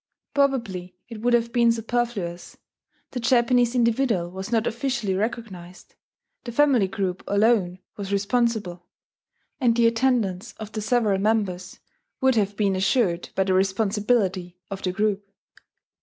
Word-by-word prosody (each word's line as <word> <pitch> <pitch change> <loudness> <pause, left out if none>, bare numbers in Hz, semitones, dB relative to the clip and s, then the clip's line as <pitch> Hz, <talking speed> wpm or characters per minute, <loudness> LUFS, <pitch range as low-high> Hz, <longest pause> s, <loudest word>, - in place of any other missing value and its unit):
Probably 230 -11 0
it 225 -3 -8
would 240 +1 +3
have 235 0 -1
been 235 -1 +4
superfluous: 225 -6 -3 0.5
the 250 - -4
Japanese 240 0 +3
individual 230 -7 +1
was 190 +4 -7
not 230 -1 +2
officially 235 -4 -1
recognized; 190 -4 -5 0.5
the 240 - -6
family 255 -5 +3
group 190 -2 -3
alone 200 -3 +2 0.2
was 200 -1 -5
responsible, 200 -4 -1 0.7
and 240 -3 +2
the 235 - +4
attendance 230 -4 +1
of 215 -1 -9
the 215 - -4
several 215 -3 +1
members 195 -4 -1 0.4
would 265 -1 +3
have 205 -3 0
been 200 -3 +1
assured 185 -2 +1
by 190 - +2
the 190 0 0
responsibility 195 -1 0
of 195 -1 -5
the 185 - -1
group. 205 0 -1
215 Hz, 135 wpm, -24 LUFS, 190-235 Hz, 0.7 s, been